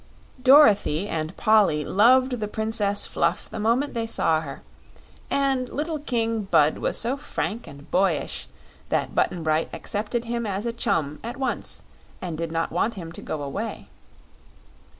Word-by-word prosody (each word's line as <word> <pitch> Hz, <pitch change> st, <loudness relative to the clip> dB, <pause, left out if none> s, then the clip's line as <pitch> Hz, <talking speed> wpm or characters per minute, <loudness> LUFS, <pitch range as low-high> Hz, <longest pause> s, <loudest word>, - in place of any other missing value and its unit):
Dorothy 215 Hz, -, +6 dB
and 160 Hz, -1 st, -3 dB
Polly 205 Hz, -10 st, +4 dB
loved 250 Hz, -, +4 dB
the 210 Hz, -, -2 dB
Princess 210 Hz, -1 st, 0 dB
Fluff 170 Hz, +1 st, 0 dB
the -, -, -5 dB
moment 235 Hz, +7 st, +1 dB
they 230 Hz, -1 st, -2 dB
saw 160 Hz, -8 st, +1 dB
her, 140 Hz, -3 st, -8 dB, 0.7 s
and 270 Hz, -2 st, +1 dB
little 310 Hz, +1 st, -3 dB
King 230 Hz, -6 st, -1 dB
Bud 155 Hz, -5 st, +3 dB
was -, -, -1 dB
so 240 Hz, +4 st, 0 dB
frank 235 Hz, -4 st, -4 dB
and 140 Hz, +2 st, -13 dB
boyish 185 Hz, -4 st, 0 dB, 0.4 s
that -, -, 0 dB
Button 175 Hz, -2 st, 0 dB
Bright 155 Hz, 0 st, +1 dB
accepted 220 Hz, +3 st, -3 dB
him 235 Hz, -1 st, -2 dB
as 200 Hz, +2 st, -2 dB
a 235 Hz, -, -1 dB
chum 150 Hz, -9 st, -1 dB
at 240 Hz, +2 st, -5 dB
once 265 Hz, -3 st, -3 dB, 0.4 s
and 175 Hz, -3 st, -4 dB
did 165 Hz, 0 st, -4 dB
not 165 Hz, 0 st, -1 dB
want 210 Hz, +7 st, 0 dB
him 165 Hz, -4 st, -7 dB
to -, -, -10 dB
go 150 Hz, -2 st, -4 dB
away. 200 Hz, +11 st, -5 dB
210 Hz, 155 wpm, -25 LUFS, 165-235 Hz, 0.7 s, Dorothy